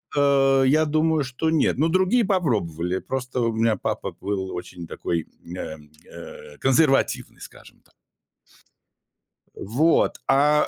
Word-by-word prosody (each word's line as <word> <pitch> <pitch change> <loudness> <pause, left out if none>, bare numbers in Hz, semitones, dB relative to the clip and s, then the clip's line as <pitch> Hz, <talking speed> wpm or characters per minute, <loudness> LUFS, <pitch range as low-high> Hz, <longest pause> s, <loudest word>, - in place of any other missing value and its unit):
Э, 135 -1 +4
я 155 +4 +3
думаю, 155 0 +1
что 130 +5 -2
нет, 160 -5 +1
но 155 +4 +2
другие 185 +7 +2
попробовали. 95 - -1
Просто 125 -1 -4
у 115 -1 0
меня 110 0 +2
папа - - -3
был 95 -2 -3
очень 85 -1 -8
такой, 85 -1 -3 0.3
э, 80 -3 -6 0.3
э, 85 -3 -11
консервативный, 135 +1 +1
скажем - - -14
так. - - -29 1.6
Вот, 145 +11 +1
а 145 +2 +3
135 Hz, 125 wpm, -23 LUFS, 100-155 Hz, 1.6 s, Э